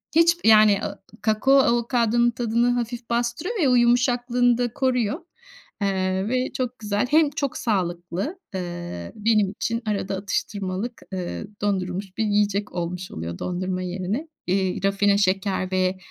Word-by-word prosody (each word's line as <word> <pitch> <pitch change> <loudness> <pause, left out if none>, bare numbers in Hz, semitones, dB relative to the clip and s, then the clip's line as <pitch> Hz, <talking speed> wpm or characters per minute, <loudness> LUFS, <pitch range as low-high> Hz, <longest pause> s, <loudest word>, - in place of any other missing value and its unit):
hiç 335 +1 +5
yani 215 -2 +7
a - - -1
ı 200 - -15 0.2
kakao 220 +5 +2
avokadonun 235 -1 +2
tadını 235 +1 +1
hafif 240 0 -3
bastırıyor 240 - -1
ya, 265 -4 +4
o - - +5
yumuşaklığını 245 0 +3
da 245 -1 -1
koruyor. 250 -5 0 0.6
Eee, 190 0 0
ve 255 +1 0
çok 255 -1 -3
güzel 210 +2 -1
hem 310 -1 +5
çok 280 -2 -3
sağlıklı, 185 - -2 0.2
eee, 175 - -5
benim 215 -2 +2
için 230 +3 -2
arada 200 -2 -1
atıştırmalık, 200 +2 -3
eee, 185 +3 -4
dondurulmuş 190 -1 -2
bir 225 - +1
yiyecek 205 0 +1
olmuş 180 +1 -4
oluyor 85 +1 -6
dondurma 185 +1 -2
yerine. 185 - -3 0.2
Eee, 190 +1 0
rafine 200 0 +3
şeker 190 -1 0
ve, 185 0 +1
210 Hz, 140 wpm, -24 LUFS, 185-240 Hz, 0.6 s, yani